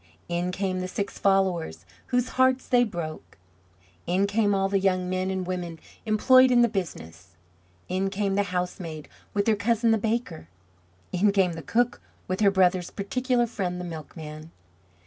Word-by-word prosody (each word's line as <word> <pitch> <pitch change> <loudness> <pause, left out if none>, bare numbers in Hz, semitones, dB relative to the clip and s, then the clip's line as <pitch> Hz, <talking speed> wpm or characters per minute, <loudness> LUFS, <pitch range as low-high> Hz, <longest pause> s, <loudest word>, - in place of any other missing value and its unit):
In 175 +1 -1
came 185 0 -2
the 185 - -3
six 200 +2 -4
followers 180 - +1 0.2
whose 250 0 0
hearts 260 0 +2
they 245 -1 +4
broke. 170 -8 -6 0.7
In 185 +3 +2
came 205 0 +2
all 195 0 +1
the 195 0 +1
young 185 -1 +1
men 185 +1 -1
and 190 -1 -2
women 175 -3 -4 0.3
employed 255 +4 +6
in 245 -1 +5
the - - +5
business. 90 - -6 0.5
In 190 +2 -1
came 195 0 -1
the 200 - +2
housemaid 180 -3 -4 0.3
with 200 0 +1
her 225 - +3
cousin 225 +2 +2
the 225 - +3
baker. 220 - -2 0.6
In 200 +3 +3
came 190 -3 +2
the 165 - -6
cook 240 - 0 0.3
with 185 +1 -2
her 205 -2 +5
brother's 185 -2 +2
particular 245 +4 0
friend 185 -6 -3
the 180 - -5
milkman. 155 -1 -8
190 Hz, 165 wpm, -26 LUFS, 175-215 Hz, 0.7 s, employed